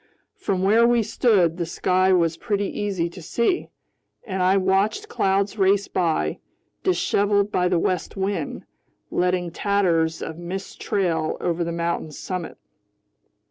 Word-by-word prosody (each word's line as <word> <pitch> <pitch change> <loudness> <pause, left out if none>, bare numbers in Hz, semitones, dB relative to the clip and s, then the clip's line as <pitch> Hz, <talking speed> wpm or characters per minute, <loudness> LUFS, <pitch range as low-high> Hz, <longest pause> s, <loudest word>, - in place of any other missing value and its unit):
From 190 -2 -2
where 225 +4 +5
we 240 -1 +3
stood, 190 -8 +2
the 170 - -1
sky 185 +2 +2
was 170 -3 +3
pretty 205 +2 -1
easy 195 -4 -2
to 180 - -11
see, 235 - 0 0.6
and 190 -3 -3
I 185 +2 +4
watched 195 - +1
clouds 200 - 0
race 195 +1 +3
by, 160 - 0 0.4
disheveled 200 +3 +1
by 180 -2 +2
the 180 -1 +2
west 180 +2 -1
wind, 195 +1 -3 0.5
letting 180 -1 0
tatters 170 -5 +1
of 160 +1 -6
mist 185 +3 -6
trail 165 -5 0
over 170 -1 -1
the 170 - -3
mountain's 170 -2 -3
summit. 180 -3 -5
185 Hz, 140 wpm, -23 LUFS, 170-200 Hz, 0.6 s, where